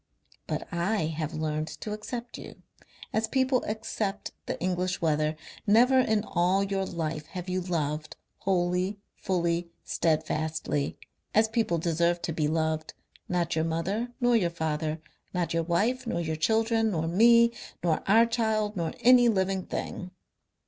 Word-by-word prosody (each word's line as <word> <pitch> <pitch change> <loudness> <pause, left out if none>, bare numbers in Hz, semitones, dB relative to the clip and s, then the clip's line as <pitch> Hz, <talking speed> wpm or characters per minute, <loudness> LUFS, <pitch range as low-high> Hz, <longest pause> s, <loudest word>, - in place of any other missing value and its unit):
But - - -3
I 175 +2 0
have 155 0 -3
learnt 155 0 -2
to 215 - -4
accept 235 +3 -6
you, - - -11 0.5
as 220 0 +1
people 260 0 +2
accept 215 -1 -3 0.2
the - - -3
English 185 +1 -1
weather.... 155 -1 +1 0.3
Never 245 +5 +6
in 220 -4 +2
all 185 0 +2
your 195 -1 -1
life 155 -2 -3
have 180 +1 -7
you 185 0 -1
loved, 155 -3 -2 0.2
wholly, 180 +1 0 0.2
fully, 170 -2 -1
steadfastly 155 -2 -1 0.4
as 220 +1 +5
people 220 -6 0
deserve 170 +1 +1
to 165 - -2
be 155 -1 0
loved 160 0 -1 0.3
not 175 -2 0
your 160 0 +1
mother 190 +9 -2
nor 245 -1 +3
your 185 -7 +3
father, 160 -1 -2 0.4
not 170 -2 0
your 165 - +2
wife 210 +10 0
nor 170 - -1
your 160 -2 -2
children, 225 +6 +2
nor 165 -5 -1
me, 235 +6 +5 0.3
nor 165 -3 +1
our 225 +4 +6
child, 220 -2 0
nor 170 -3 -2
any 245 -1 +7
living 190 -3 0
thing. 180 - -4
180 Hz, 150 wpm, -28 LUFS, 160-220 Hz, 0.5 s, any